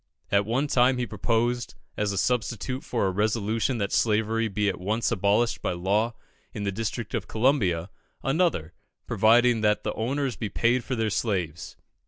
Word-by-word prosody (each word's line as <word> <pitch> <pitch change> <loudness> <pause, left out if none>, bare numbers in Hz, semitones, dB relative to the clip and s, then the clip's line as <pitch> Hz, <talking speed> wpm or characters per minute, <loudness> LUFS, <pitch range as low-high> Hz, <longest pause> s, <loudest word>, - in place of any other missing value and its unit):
At 100 +1 +2
one 125 +6 +1
time 130 -2 +3
he 125 - -1
proposed, 120 +1 -1 0.2
as 105 -1 0
a 100 - -3
substitute 125 +2 -1
for 115 -5 -1
a 95 - +1
resolution 110 +4 0
that 100 -2 -2
slavery 110 +1 +1
be 105 0 -1
at 95 - -1
once 105 +4 -1
abolished 105 +5 +1
by - - -1
law 105 +6 0 0.4
in 105 - -3
the 100 - 0
district 110 +2 -4
of - - -2
Columbia, 105 - +1 0.3
another, 135 - 0 0.3
providing 115 +2 +4
that 105 -1 +2
the - - -2
owners 130 +3 -1
be 110 - -4
paid 120 +5 +1
for 130 - -3
their 110 -2 0
slaves. 90 -8 -2
110 Hz, 170 wpm, -26 LUFS, 100-120 Hz, 0.4 s, providing